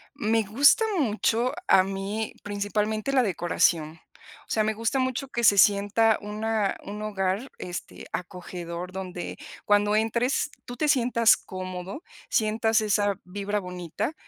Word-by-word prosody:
Me 225 -4 +1
gusta 280 - +5 0.2
mucho 235 0 +1
a 185 - +6
mí, 195 +3 -4
principalmente, 210 +4 -2
la 260 -2 +4
decoración, 165 -4 +1 0.5
o - - -12
sea, 215 - +2
me 220 0 0
gusta 230 +4 -1
mucho 260 +1 -1
que 240 -2 -3
se 205 -2 +6
sienta 205 +3 +4
una 210 0 -1
un 210 +1 -7
hogar, 200 +3 -2
este, 180 0 -7
acogedor, 180 -1 -6
donde 185 -2 -6 0.3
cuando 205 0 +3
entres, 235 +6 +1
tú 245 - -7
te 305 - 0
sientas 240 -4 +4
cómodo, 185 - -7 0.3
sientas 220 0 +2
esa 205 -1 +1
vibra 200 +2 -3
bonita, 180 - -4
210 Hz, 135 wpm, -26 LUFS, 190-225 Hz, 0.5 s, a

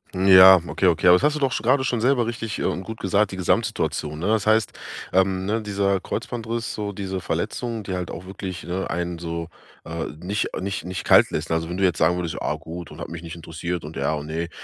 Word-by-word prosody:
Ja, 95 0 +9
okay, 95 - 0
okay, 85 0 +2
aber 90 +1 +7
hast 150 0 +2
du - - -3
doch 135 -3 +1
sch - - -2
grade 130 +4 +3
schon 125 -4 -1
selber 125 0 +3
richtig 115 -2 -4
und, - - 0
äh, - - -7
gut 110 +2 -8
gesagt, 100 +1 +1
die 95 - -6
Gesamtsituation, 85 -7 -1
ne? 80 - -4
Das 110 -1 +1
heißt, 110 -2 +3 0.4
ähm, 95 0 +2
ne, 110 +3 0
dieser 100 -2 0
Kreuzbandriss, 115 +3 -4
so 105 -1 -4
diese 95 -1 -4
Verletzungen, 115 +2 -3
die 95 - -5
halt 90 -2 -3
auch 85 - -7
wirklich, 95 -1 -6
ne, 90 +2 -3
einen 85 -1 -3
so, 85 0 -4 0.4
äh, 80 0 -4
nicht 100 +5 -1
nicht 95 +1 -3
nicht 90 +1 -5
kalt - - +6
lässt. 80 +2 -3
Also, 80 0 -1
wenn 90 - -4
du 95 - 0
jetzt 90 -4 +2
sagen 90 - +4
würdest: 85 -2 -3
„Ah, - - -1
gut 85 +1 -8
und - - -12
hat - - -6
mich 85 -1 -7
nicht 85 -1 -8
interessiert 85 +1 -5
und 75 +2 -8
ja 70 +3 0
und 75 -1 -5
ne“, 80 +2 -3
95 Hz, 240 wpm, -23 LUFS, 85-105 Hz, 0.4 s, Ja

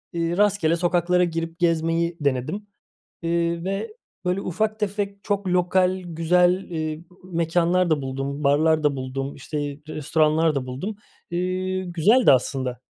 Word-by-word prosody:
ııı, 170 +1 -1
rastgele 200 -6 +3
sokaklara 175 +1 +2
girip 165 0 -3
gezmeyi 165 0 +1
denedim. 145 +9 -1 0.5
Eee, 170 0 0
ve, 195 - -4 0.3
böyle, 180 +2 0
ufak 215 +5 -1
tefek, 200 -1 -3
çok 200 -2 -1
lokal, 180 +1 +2
güzel, 175 +2 +2
ııı, 155 0 -3 0.3
mekânlar 170 +2 +2
da 150 -3 +2
buldum, 135 +2 -4
barlar 155 +2 +3
da 145 -2 +2
buldum, 135 +1 -4
işte, 145 +2 -6 0.3
restoranlar 155 +1 +2
da 130 -2 -1
buldum. 185 +12 -4 0.4
İii, 185 +1 -2
güzeldi 215 - +5
aslında. 130 -1 0
170 Hz, 130 wpm, -24 LUFS, 155-185 Hz, 0.5 s, güzeldi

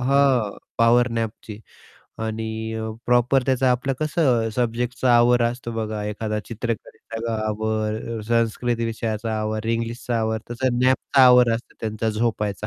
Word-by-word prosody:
हं, 130 -5 +2 0.2
पॉवर 120 +2 +5
नॅपची 110 -1 -5 0.7
आणि 110 0 -4
अ, 110 0 -3 0.2
प्रॉपर 125 +2 +3
त्याचं 130 0 +2
आपलं 125 +2 +1
कसं 135 -7 +2
सब्जेक्टचा 120 +1 +1
आवर 120 0 +4
असतो 120 0 -2
बघा 110 -2 -3
एखादा 105 0 -3
चित्रकलेचा 115 0 -5
आवर 110 0 -1 0.2
अ, - - -5
संस्कृत 115 +1 +1
विषयाचा 110 -1 -2
आवर, 110 +1 -3
इंग्लिशचा 115 +1 -2
आवर 110 0 0
तसं 120 0 0
नॅपचा 130 +1 +3
आवर 125 -1 +6
असतो 115 - -7
त्यांचा 110 0 -2
झोपायचा. 105 -2 -1
115 Hz, 135 wpm, -23 LUFS, 110-125 Hz, 0.7 s, आवर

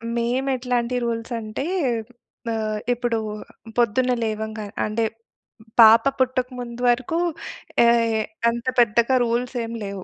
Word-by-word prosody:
మేము 240 +3 0
ఎట్లాంటి 250 -1 -1
రూల్స్ 230 0 -3
అంటే, 215 +3 -5 0.9
ఆహ్, 215 -1 -2
ఇప్పుడు 240 -1 -1 0.6
పొద్దున్నే 245 +2 +2
లేవంగానే 215 -1 -4
అంటే 215 +2 -1 0.8
పాప 225 0 +9 0.2
పుట్టక 255 -1 +1
ముందు 240 0 -7
వరకు 250 +7 0 0.7
యాయ్ 235 -1 +4 0.4
అంత 235 +1 -4
పెద్దగా 235 +2 +4
రూల్సేం 240 0 -2
లేవు. 195 -2 -6
235 Hz, 110 wpm, -23 LUFS, 220-245 Hz, 0.9 s, పాప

